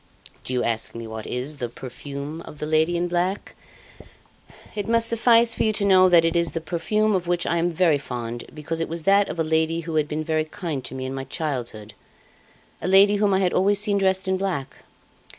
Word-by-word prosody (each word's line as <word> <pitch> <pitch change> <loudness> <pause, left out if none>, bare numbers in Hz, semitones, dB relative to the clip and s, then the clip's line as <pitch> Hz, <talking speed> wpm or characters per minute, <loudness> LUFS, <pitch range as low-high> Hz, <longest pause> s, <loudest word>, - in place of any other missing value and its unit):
"Do - - -5
you 125 - 0
ask 115 -1 -2
me 115 0 -6
what 110 -1 -7
is 130 +5 -4
the 120 -3 -4
'perfume 140 +5 -7
of 150 - -11
the 150 - -4
lady 160 +3 +2
in 175 +1 0
black'? 180 +3 -2 1.2
It 205 -2 -4
must 230 0 +3
suffice 230 0 +4
for - - -4
you 220 - +2
to 205 -1 0
know 185 -1 +6
that 170 -2 +5
it 165 +1 0
is 170 -1 0
a - - 0
perfume 210 +6 0
of 180 -2 -1
which 175 0 0
I 170 - 0
am 170 +1 +1
very 165 -3 +2
fond, 120 -2 -6
because 160 +2 -5
it 165 - -2
was 165 0 -4
that 200 +3 +4
of - - -5
a - - +2
lady 160 +1 0
who 165 0 -6
had 150 -1 +1
been 155 +1 -3
very 155 0 0
kind 155 -5 -5
to - - -5
me 130 0 -4
in 130 - -4
my 135 0 -5
childhood, 125 - -5 0.9
a - - -3
lady 200 +2 +5
whom 205 0 +2
I 190 0 +2
had 180 -2 +1
always 200 +2 +2
seen 205 -1 +1
dressed 190 0 +1
in 190 0 +1
black. 180 -9 -3
165 Hz, 225 wpm, -23 LUFS, 145-190 Hz, 1.2 s, know